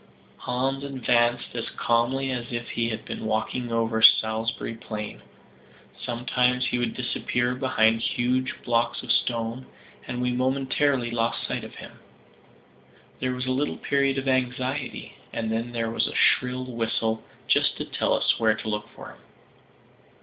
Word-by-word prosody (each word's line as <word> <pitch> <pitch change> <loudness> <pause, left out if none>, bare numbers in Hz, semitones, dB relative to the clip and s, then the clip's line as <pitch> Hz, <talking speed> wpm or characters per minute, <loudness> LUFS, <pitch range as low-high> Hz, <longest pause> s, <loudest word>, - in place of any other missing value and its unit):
Hans 135 +2 -1
advanced 120 -3 +1
as 115 -2 -3
calmly 130 +3 +1
as 120 -1 -4
if 120 0 -4
he 115 0 0
had 110 - -5
been - - -5
walking 115 +2 -1
over 115 -1 +1
Salisbury 110 +1 +4
Plain; 105 -2 -6 0.8
sometimes 125 +1 +1
he 125 - 0
would 120 -2 -1
disappear 120 0 0
behind 115 -3 +2
huge 125 +3 0
blocks 120 -1 +1
of - - -1
stone, 115 +1 0 0.4
and 125 - -3
we 125 0 +1
momentarily 130 0 +1
lost 115 0 0
sight - - -3
of - - -9
him. - - -11 1.2
There 130 0 0
was 125 0 -3
a 130 - 0
little 140 +3 0
period 140 -1 +1
of 135 0 -2
anxiety 130 +1 -1 0.2
and 110 -1 -2
then 115 +2 -1
there 115 -1 -1
was - - +1
a - - -6
shrill 125 0 +3
whistle, 115 -2 -1 0.2
just - - +3
to - - -3
tell - - 0
us - - +2
where 110 -1 +4
to 110 - -5
look 105 0 -3
for - - -9
him. - - -15
120 Hz, 155 wpm, -26 LUFS, 115-130 Hz, 1.2 s, Salisbury